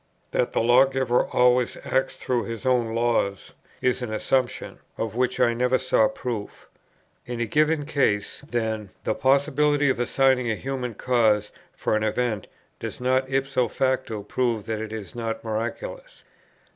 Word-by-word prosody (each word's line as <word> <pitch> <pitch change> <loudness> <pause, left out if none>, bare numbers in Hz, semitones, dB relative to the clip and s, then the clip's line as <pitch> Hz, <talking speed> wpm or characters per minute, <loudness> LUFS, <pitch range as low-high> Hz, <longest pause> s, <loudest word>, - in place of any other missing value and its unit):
That - - +1
the - - +1
Lawgiver 130 +1 +3
always 125 0 +3
acts 130 - 0
through 125 -2 -1
His 115 +1 -6
own 120 -3 +2
laws, 115 -4 0 0.3
is 125 0 +1
an 120 -3 -4
assumption, 130 +4 -1 0.2
of 110 -1 -3
which 125 0 0
I 120 - +4
never 125 +2 +2
saw 110 - +3
proof. 115 -4 -6 0.6
In 120 -1 -4
a 120 - +1
given 150 +5 +2
case, 135 -9 0
then, 110 -3 -2
the - - 0
possibility 140 +2 +3
of 130 - -3
assigning 125 0 +2
a 110 - +1
human 130 -2 -4
cause 110 -4 +2 0.2
for - - -1
an 110 - +1
event 110 -1 -1 0.3
does - - -6
not 130 +1 +1
ipso 135 -2 +1
facto 130 -4 -1
prove 115 0 -1
that 110 -1 -3
it 110 -1 -5
is 110 -4 -7
not 115 -1 -4
miraculous. - - -5
125 Hz, 155 wpm, -25 LUFS, 110-130 Hz, 0.6 s, I